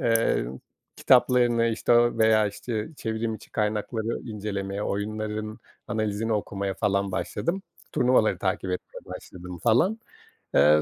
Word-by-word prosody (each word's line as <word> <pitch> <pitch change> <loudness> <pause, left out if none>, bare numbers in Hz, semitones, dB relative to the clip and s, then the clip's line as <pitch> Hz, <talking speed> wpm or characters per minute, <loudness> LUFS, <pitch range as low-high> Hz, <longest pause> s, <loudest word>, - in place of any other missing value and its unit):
eee, 115 - +2 0.5
kitaplarını, 120 -2 +4
işte, 115 +1 +1
o 120 -1 +4
veya, 110 -1 +5
işte, 105 +2 -4
çevrim 110 -1 -2
içi - - -12
kaynakları 110 +2 -1
incelemeye, 100 -3 -4
oyunların 110 +1 -3 0.3
analizini 110 +1 -1
okumaya 100 -2 -2
falan 100 -2 0
başladım. 190 - -2 0.3
Turnuvaları 125 -3 +3
takip 95 -1 -1
etmeye 90 - -5
başladım, 90 0 -9
falan. 160 - +3 0.6
Eee, 75 +2 +6
110 Hz, 115 wpm, -26 LUFS, 100-115 Hz, 0.6 s, Eee